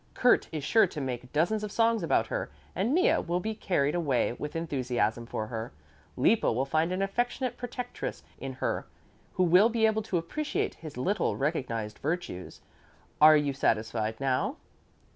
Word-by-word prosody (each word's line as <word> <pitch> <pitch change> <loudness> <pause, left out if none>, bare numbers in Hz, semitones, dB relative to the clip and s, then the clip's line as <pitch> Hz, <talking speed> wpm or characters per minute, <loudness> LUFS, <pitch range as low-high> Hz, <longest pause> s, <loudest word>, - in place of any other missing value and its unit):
Kurt 245 - +4
is 155 -3 -4
sure 220 +6 +4
to 160 - -7
make 125 -2 -4
dozens 175 +8 +1
of 210 - -4
songs 230 -1 +2
about 160 -5 +2
her - - -3 0.3
and 205 +6 0
Mea 365 - +4
will 175 +1 -1
be 220 +4 -3
carried 150 -9 0
away 145 -9 +1
with 150 +5 -6
enthusiasm 125 -8 -1
for 110 - -3
her. 110 +1 -5 0.5
Lippo 225 - +3
will 125 +4 0
find 155 +4 +1
an 185 +2 0
affectionate 245 +5 -1
protectress 245 0 -5 0.2
in - - -5
her - - -2 0.5
who 185 - +2
will 180 +6 +6
be 230 -1 +2
able 220 0 +2
to 205 -4 -1
appreciate 300 - -2
his 155 -5 -10
little 195 +12 0
recognized 120 -7 -2
virtues. 155 - -4 0.6
Are 155 0 +9
you 145 -2 0
satisfied 110 -3 0
now?" 135 -2 0
165 Hz, 165 wpm, -29 LUFS, 130-215 Hz, 0.6 s, Are